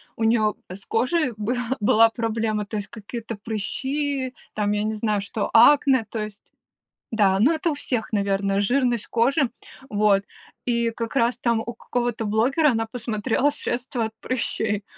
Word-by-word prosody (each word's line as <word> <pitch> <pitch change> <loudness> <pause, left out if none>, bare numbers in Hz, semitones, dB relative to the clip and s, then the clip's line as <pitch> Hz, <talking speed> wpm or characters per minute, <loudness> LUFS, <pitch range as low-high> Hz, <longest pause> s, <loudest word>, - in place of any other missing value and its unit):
у 225 - -3
неё 220 -2 +3 0.2
с 195 +2 -9
кожей 265 +4 +1
был 225 +4 -1 0.2
была 225 +2 +5
проблема. 225 -2 -1
То 215 - -5
есть 205 -1 -4
какие-то 230 +1 -7
прыщи 260 +6 -3 0.2
там, 210 -1 0
я 210 0 0
не 220 0 -1
знаю, 210 -1 0
что 205 +1 -3
акне, 265 0 +6
то 225 - -4
есть 210 -1 -6 0.7
Да, 195 -3 +4
ну 250 +11 +4
это 330 +1 0
у - - 0
всех, 245 -6 -2
наверное, 200 -1 +1
жирность 245 +1 +1
кожи. 265 +4 +2 0.4
Вот 205 -1 +3 0.5
и 235 -1 +2
как 230 +2 -5
раз 240 -1 +2
там 235 -2 +1
у 235 +1 -5
какого-то 240 -1 -2
блогера 250 +9 +3
она 225 -1 -1
посмотрела 230 +3 0
средство 250 -4 -2
от 220 - -4
прыщей. 220 -5 -1
225 Hz, 160 wpm, -24 LUFS, 210-250 Hz, 0.7 s, акне